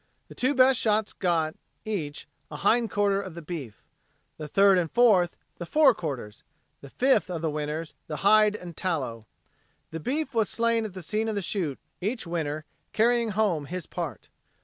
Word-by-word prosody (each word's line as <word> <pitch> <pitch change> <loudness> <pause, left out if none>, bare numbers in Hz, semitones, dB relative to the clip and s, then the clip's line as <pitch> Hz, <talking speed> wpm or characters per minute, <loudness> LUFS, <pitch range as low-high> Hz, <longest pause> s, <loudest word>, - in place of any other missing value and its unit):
The - - -10
two 260 +3 0
best 255 -1 +5
shots 215 -1 +1
got, 165 -4 0 0.3
each, 160 -9 -4 0.2
a 150 - -8
hindquarter 205 +2 +2
of 185 -4 -8
the 170 - -7
beef. 150 -9 -7 0.6
The 155 - -5
third 195 +4 +5
and 165 -2 -1
fourth, 210 -8 +4 0.2
the 175 - -4
forequarters; 165 - +1 0.4
the 140 - -11
fifth 260 - +2
of 170 -2 -4
the 160 - 0
winners, 150 +2 -4
the 150 - -4
hide 210 0 +6
and 175 -5 -8
tallow. 130 - -3 0.6
The 160 - -5
beef 275 - -2
was 220 -3 +1
slain 230 -1 +1
at 200 -3 -7
the 185 - -7
scene 215 +6 -1
of 220 - -2
the 200 - -2
shoot, 165 -7 -2 0.2
each 215 +5 -2
winner 155 -3 -3 0.3
carrying 235 +1 +3
home 200 -8 0
his 180 0 -5
part. - - -6
185 Hz, 170 wpm, -27 LUFS, 155-220 Hz, 0.6 s, hide